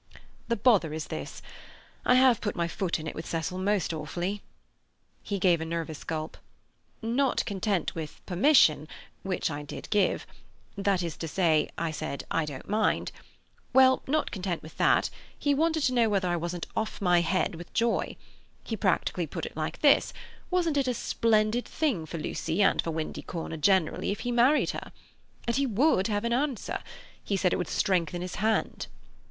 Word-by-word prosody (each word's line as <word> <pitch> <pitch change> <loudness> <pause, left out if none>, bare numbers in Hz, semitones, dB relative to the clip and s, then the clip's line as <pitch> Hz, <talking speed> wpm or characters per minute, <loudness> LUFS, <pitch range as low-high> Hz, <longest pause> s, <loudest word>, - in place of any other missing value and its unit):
"The 235 - +1
bother 205 -8 +3
is 155 - -4
this: - - -6 0.6
I 250 - +5
have 255 -3 +5
put 205 - -2
my 170 -1 0
foot 175 0 -2
in 155 - -7
it - - -4
with 160 - -7
Cecil 170 +3 -3
most 195 -3 0
awfully." 175 +6 -3 0.8
He 200 - -3
gave 180 -3 +3
a - - -1
nervous 165 -2 -4
gulp. 155 0 -4 0.7
"Not 245 +4 +1
content 200 -2 -1
with 160 -2 -6
'permission', 175 - +4 0.3
which 185 -4 -1
I 145 0 -4
did 145 - -8
give—that 200 -2 -1
is 170 -2 -4
to 165 - -4
say, 160 -2 +2
I 165 -1 -1
said, 155 -2 -4
'I 165 - +1
don't 140 -3 -8
mind'—well, 260 +4 +1
not 305 +3 0
content 185 -4 -3
with 155 - -11
that, - - +3 0.3
he 285 - +1
wanted 320 +1 +1
to 255 - +2
know 235 -3 +3
whether 195 -3 +1
I 175 - +1
wasn't 170 +1 -3
off 220 0 -2
my 180 -3 +4
head 185 +2 0
with 170 +1 -9
joy. 230 0 +1 0.5
He - - -3
practically - - 0
put - - -5
it - - -8
like - - -4
this: - - +5 0.4
Wasn't 340 -5 +1
it 275 -2 +1
a 250 - 0
splendid 220 +1 +1
thing 235 - -1
for 165 - -5
Lucy 165 +4 -1
and 195 - +4
for - - -4
Windy 160 -1 -3
Corner 165 -2 -5
generally 175 +1 +2
if 200 - -2
he 245 - -2
married 245 +5 +4
her? - - -7 0.5
And 235 +1 0
he 275 0 +2
would 230 -3 +3
have 205 -1 -1
an 235 0 0
answer—he 265 - -3
said 180 -1 +2
it - - +1
would - - -2
strengthen 180 -2 0
his 180 - -5
hand." 220 0 0
195 Hz, 175 wpm, -28 LUFS, 165-235 Hz, 0.8 s, I